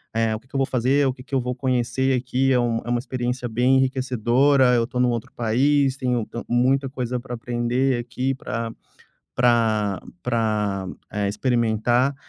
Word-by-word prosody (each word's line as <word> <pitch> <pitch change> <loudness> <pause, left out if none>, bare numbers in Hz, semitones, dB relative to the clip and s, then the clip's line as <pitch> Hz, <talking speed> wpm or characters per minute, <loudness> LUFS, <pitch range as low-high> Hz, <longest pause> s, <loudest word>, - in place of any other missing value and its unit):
"eh, 115 -1 +1
o - - -6
que 125 - -27
que 140 - -15
eu - - +2
vou 135 - +3
fazer, 130 +3 +2
o 130 - 0
que 125 - -13
que 140 - -19
eu 130 - +2
vou 125 0 -3
conhecer 130 0 0
aqui, 130 +2 0
é 125 - +3
um 120 -1 +1
é - - -5
uma 120 0 +1
experiência 125 -1 -3
bem 125 +4 +3
enriquecedora, 130 0 +3
eu 120 - +3
estou 125 +1 -2
em - - +4
um - - +2
outro 120 -2 -3
país, 135 +4 +2
tenho 125 -3 0
tan 120 - -6
muita 130 +3 +2
coisa 125 -2 -3
para 125 0 -8
aprender 120 +2 0
aqui, 125 +3 -2
pra 115 -3 -4 0.6
pra 110 -5 +2 0.2
pra, 105 -5 -1 0.2
eh, 105 -1 -1
experimentar". 120 +3 +1
125 Hz, 190 wpm, -23 LUFS, 115-130 Hz, 0.6 s, em